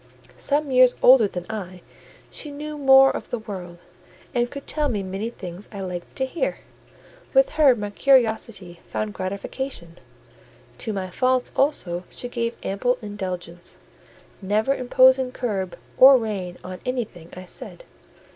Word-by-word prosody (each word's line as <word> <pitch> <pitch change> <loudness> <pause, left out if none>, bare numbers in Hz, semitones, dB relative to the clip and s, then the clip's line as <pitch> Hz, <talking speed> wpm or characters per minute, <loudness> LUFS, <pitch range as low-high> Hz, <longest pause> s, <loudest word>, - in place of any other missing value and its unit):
Some 290 0 0
years 255 -1 +6
older 250 -4 +7
than 180 -2 -6
I, 185 -5 -7 0.5
she 300 - -5
knew 300 +1 -6
more 270 -1 +6
of - - -6
the 245 - -2
world, 185 -6 -8 0.6
and 240 -1 +1
could 280 +1 -8
tell 300 -2 -1
me 205 -5 -2
many 195 +4 -4
things 180 -4 -9
I 200 -2 -7
liked 180 -2 -6
to 265 - 0
hear: 340 - -2 0.8
with - - +5
her 285 - +5
my 205 -2 -5
curiosity 220 -8 +1
found 215 -1 -3
gratification: 190 -1 -5 0.8
to 220 - -3
my 190 -3 -4
faults 255 +3 +1
also 185 - 0
she 245 - -6
gave 235 -1 -2
ample 245 +6 0
indulgence, 180 -4 -6 0.6
never 215 +7 +1
imposing 255 0 +4
curb 195 -7 -3 0.2
or 265 +1 +10
rein 195 -6 -4
on 185 0 -7
anything 220 -10 -4
I 185 - -8
said. - - -9
220 Hz, 145 wpm, -23 LUFS, 185-260 Hz, 0.8 s, or